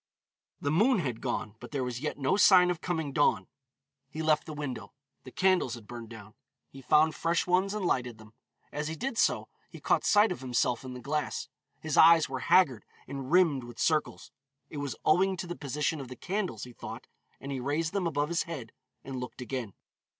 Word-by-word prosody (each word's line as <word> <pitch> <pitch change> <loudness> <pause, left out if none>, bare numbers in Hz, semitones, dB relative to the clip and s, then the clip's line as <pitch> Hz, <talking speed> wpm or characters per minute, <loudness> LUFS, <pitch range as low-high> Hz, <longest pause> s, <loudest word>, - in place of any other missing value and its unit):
The 145 - -1
moon 220 +10 +4
had 130 - -3
gone, 105 - -3
but - - -10
there 140 -3 -2
was 125 -1 -4
yet 155 - -3
no 140 +6 +1
sign 185 -3 +6
of 170 -2 -5
coming 160 -5 -2
dawn. 145 - +2 0.6
He 160 - -5
left 155 0 +2
the 155 - -6
window. 145 -4 -6 0.3
The 130 - -9
candles 185 -10 +2
had 115 -3 -12
burned 115 0 -9
down; 110 -2 -11 0.4
he 135 - -11
found 155 +4 +4
fresh 165 0 0
ones 185 +3 +1
and 205 -3 -2
lighted 125 -7 0
them. 110 0 -16 0.4
As 150 +1 -3
he 160 - -4
did 255 +6 -3
so, - - +2 0.2
he - - -11
caught - - +1
sight 210 -1 +4
of 180 - -5
himself 125 -1 0
in 130 -1 -7
the 125 - -8
glass. 150 +3 -3 0.3
His 155 -2 -2
eyes 165 -1 +7
were 130 -1 -4
haggard 130 - +3 0.2
and 135 0 -6
rimmed 165 -7 +4
with 120 -1 -11
circles. 155 -2 0 0.4
It 150 - -7
was 145 -1 -3
owing 190 +4 +3
to 185 - -4
the 175 0 -5
position 150 +1 -2
of 135 - -8
the 125 - -9
candles, 185 - -3
he 125 - -9
thought, - - -8 0.3
and 140 - -7
he 135 - -3
raised 150 +6 -1
them 195 -4 0
above 145 -1 -1
his 170 0 0
head 130 -9 -6 0.3
and 135 -1 -6
looked 125 +1 -7
again. 125 -4 -5
145 Hz, 210 wpm, -29 LUFS, 125-170 Hz, 0.6 s, eyes